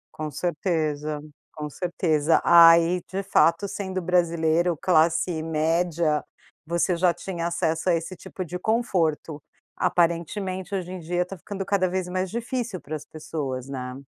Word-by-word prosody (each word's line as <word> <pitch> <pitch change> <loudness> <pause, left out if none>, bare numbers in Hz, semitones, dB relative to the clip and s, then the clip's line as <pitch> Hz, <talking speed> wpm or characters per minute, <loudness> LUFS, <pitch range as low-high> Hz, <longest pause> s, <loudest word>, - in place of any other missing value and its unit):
Com 155 -1 -4
certeza, 155 -3 -2 0.3
com 150 -1 -4
certeza. 165 -3 +1
Aí, 170 +1 +7
de 195 +1 -2
fato 170 0 +3
sendo 190 -1 -4
brasileiro 170 -1 +1
classe 165 0 +2
média, 160 0 0 0.4
você 170 +1 +1
já 175 +1 +3
tinha 170 0 -4
acesso 165 0 -1
a 170 - +4
esse 165 +3 -4
tipo 185 +2 -7
de 180 +2 -6
conforto. 170 -9 0 0.3
Aparentemente, 180 +3 0
hoje 180 -2 -4
em 185 - -6
dia 175 +2 -1
tá 195 +2 -8
ficando 195 +2 -6
cada 185 -2 +1
vez 185 0 -2
mais 185 +1 -2
difícil 235 -3 -3
para 155 +2 -6
as 150 - -7
pessoas, 140 -5 -5
né. 125 -2 -5
170 Hz, 145 wpm, -25 LUFS, 160-185 Hz, 0.4 s, Aí